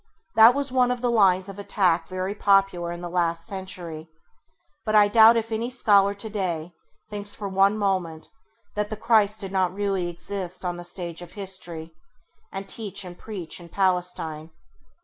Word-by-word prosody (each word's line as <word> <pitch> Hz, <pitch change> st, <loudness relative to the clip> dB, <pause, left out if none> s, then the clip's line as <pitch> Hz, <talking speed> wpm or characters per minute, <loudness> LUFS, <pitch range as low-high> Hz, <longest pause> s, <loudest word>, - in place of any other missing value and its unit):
That 225 Hz, +3 st, +8 dB
was 280 Hz, -2 st, -1 dB
one 250 Hz, -1 st, +3 dB
of 250 Hz, -1 st, -2 dB
the 245 Hz, -1 st, +1 dB
lines 190 Hz, -4 st, +4 dB
of 195 Hz, 0 st, -9 dB
attack 180 Hz, -5 st, +1 dB
very 185 Hz, +1 st, -3 dB
popular 195 Hz, -4 st, +2 dB
in 175 Hz, 0 st, -6 dB
the 175 Hz, -, -5 dB
last 170 Hz, -1 st, 0 dB
century, 175 Hz, -5 st, -7 dB, 0.7 s
but 215 Hz, -1 st, 0 dB
I 210 Hz, -1 st, +7 dB
doubt 225 Hz, +2 st, +7 dB
if 225 Hz, 0 st, -2 dB
any 225 Hz, +2 st, -1 dB
scholar 205 Hz, -5 st, +3 dB
today 185 Hz, -6 st, -3 dB, 0.4 s
thinks 205 Hz, 0 st, -3 dB
for 205 Hz, -, -5 dB
one 195 Hz, +2 st, +3 dB
moment 185 Hz, -6 st, -1 dB, 0.5 s
that 210 Hz, 0 st, -2 dB
the 215 Hz, -, -5 dB
Christ 215 Hz, -2 st, +3 dB
did 195 Hz, -1 st, -5 dB
not 185 Hz, -2 st, +1 dB
really 195 Hz, -3 st, -1 dB
exist 185 Hz, +1 st, -5 dB
on 175 Hz, -1 st, -2 dB
the 175 Hz, -, -7 dB
stage 175 Hz, -1 st, -6 dB
of 175 Hz, -1 st, -11 dB
history, 175 Hz, -5 st, -5 dB, 0.6 s
and 195 Hz, +1 st, -6 dB
teach 200 Hz, -2 st, -4 dB
and 175 Hz, -1 st, -9 dB
preach 185 Hz, -5 st, -6 dB
in 170 Hz, -1 st, -12 dB
Palestine. 180 Hz, -4 st, -1 dB
195 Hz, 170 wpm, -25 LUFS, 175-210 Hz, 0.7 s, That